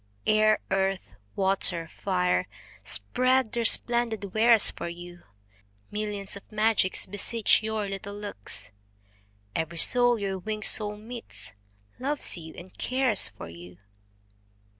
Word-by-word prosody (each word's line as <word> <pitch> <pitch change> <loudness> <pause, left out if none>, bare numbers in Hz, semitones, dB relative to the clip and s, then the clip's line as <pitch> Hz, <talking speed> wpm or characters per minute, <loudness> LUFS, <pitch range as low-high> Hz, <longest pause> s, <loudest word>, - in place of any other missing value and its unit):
Air, 215 0 +4
earth, 190 - -1 0.2
water, 190 -3 +1
fire, 180 - 0 0.4
spread 250 - +1
their 235 - -1
splendid 225 -4 +3
wares 225 0 +5
for 170 - -6
you. 175 0 -10 0.7
Millions 205 -2 -2
of 200 - -13
magics 215 -3 +1
beseech 205 +3 +2
your 215 -1 -2
little 195 +1 -6
looks; 205 - -4 0.8
Every 160 +1 -3
soul 245 +5 +5
your 195 -2 -3
winged 215 +2 -4
soul 210 -1 +1
meets, 230 +2 -8 0.5
loves 285 +3 0
you 160 -2 -9
and 180 +2 -12
cares 255 -5 +2
for - - -10
you. 85 +1 -12
205 Hz, 120 wpm, -27 LUFS, 180-225 Hz, 0.8 s, wares